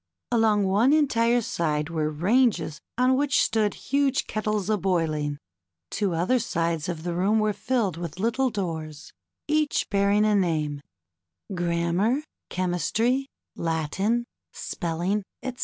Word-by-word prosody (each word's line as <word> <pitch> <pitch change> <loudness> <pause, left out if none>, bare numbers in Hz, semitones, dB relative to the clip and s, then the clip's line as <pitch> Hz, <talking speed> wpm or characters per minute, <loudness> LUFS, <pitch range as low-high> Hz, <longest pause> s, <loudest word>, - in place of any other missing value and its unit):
Along 220 -3 +3
one 205 +8 +3
entire 240 -5 +3
side 150 -4 -1
were 155 -2 0
ranges 175 - +1 0.2
on 255 +1 +4
which 280 0 +2
stood 215 -2 +1
huge 275 -1 0
kettles 215 -2 -2
a 215 - +2
boiling. 160 -6 0 0.5
Two 195 -5 0
other 185 +10 +2
sides 165 -5 -1
of 165 -2 -4
the 175 0 -2
room 195 +5 +2
were 215 -1 +2
filled 215 - -1
with 170 -1 -6
little 235 +5 +1
doors, 160 -8 -5 0.3
each 305 -1 +1
bearing 200 +1 +3
a 215 - +3
name: 155 -7 0 0.7
Grammar, 175 - 0 0.3
Chemistry, 185 - 0 0.3
Latin, 170 +9 -1 0.3
Spelling, 175 +5 -2 0.2
etc. 255 -1 -5
200 Hz, 125 wpm, -25 LUFS, 165-230 Hz, 0.7 s, on